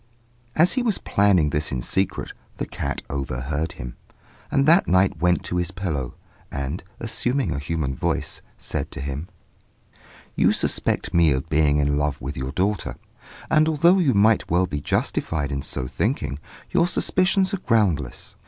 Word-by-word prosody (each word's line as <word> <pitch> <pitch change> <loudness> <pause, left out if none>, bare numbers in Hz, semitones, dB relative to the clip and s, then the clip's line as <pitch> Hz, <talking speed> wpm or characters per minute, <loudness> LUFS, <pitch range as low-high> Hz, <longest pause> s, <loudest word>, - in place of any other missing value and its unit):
As 170 +3 +5
he 255 - +1
was 225 -5 +1
planning 95 -7 +2
this 75 +1 -1
in 65 -3 -2
secret, 95 0 -1 0.2
the - - -2
cat - - -4
overheard 70 +3 -3
him, - - -8 0.5
and 140 -1 +2
that 170 +5 +5
night 95 +1 +3
went 90 0 +2
to 90 - -3
his 90 -1 0
pillow, 85 -9 -3 0.4
and, 70 +5 -4 0.2
assuming 125 +3 0
a 70 - -3
human 75 -2 -2
voice, - - -2 0.2
said - - -4
to - - -7
him 70 +4 -4 1.1
"'You - - +4
suspect - - 0
me 85 -3 +5
of 65 0 -2
being 75 -1 +3
in 70 0 +1
love 75 -2 -1
with 65 +3 -5
your 65 +1 -4
daughter; 95 +5 -1 0.5
and 155 0 +3
although 170 +5 +4
you 140 - +2
might 110 +2 +3
well 90 +2 +3
be 75 -5 -4
justified 75 0 -1
in 70 -1 -2
so 65 - -3
thinking, 65 +2 -2 0.3
your 170 - +3
suspicions 185 +2 +2
are 195 - -1
groundless. 95 - 0
85 Hz, 160 wpm, -23 LUFS, 70-115 Hz, 1.1 s, As